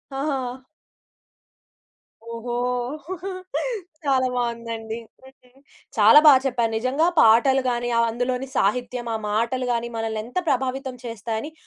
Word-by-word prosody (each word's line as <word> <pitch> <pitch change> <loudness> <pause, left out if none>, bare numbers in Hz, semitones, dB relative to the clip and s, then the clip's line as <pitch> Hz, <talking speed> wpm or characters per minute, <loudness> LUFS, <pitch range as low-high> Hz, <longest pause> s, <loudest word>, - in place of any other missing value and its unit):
ఆహా! 265 -2 -3 1.7
ఓహో! 235 +1 -5 1.5
చాలా 260 -2 +2
బావుందండి. 230 -2 -3 0.3
హ్మ్. 265 0 -21 0.4
చాలా 220 +6 +8
బా 295 - +11
చెప్పారు. 240 -3 0
నిజంగా 260 +8 +1
పాటలు‌ 240 +4 +5
గానీ, 240 0 -1
ఆహ్, 230 - +4
అందులోని 250 +2 -2
సాహిత్యం, 240 +3 0
ఆ - - 0
మాటలు‌ 235 +4 0
గానీ, 235 0 -2
మనల్నెంత 225 +5 -4
ప్రభావితం 260 0 -1
చేస్తాయని, 230 +4 -4
245 Hz, 105 wpm, -23 LUFS, 230-260 Hz, 1.7 s, బా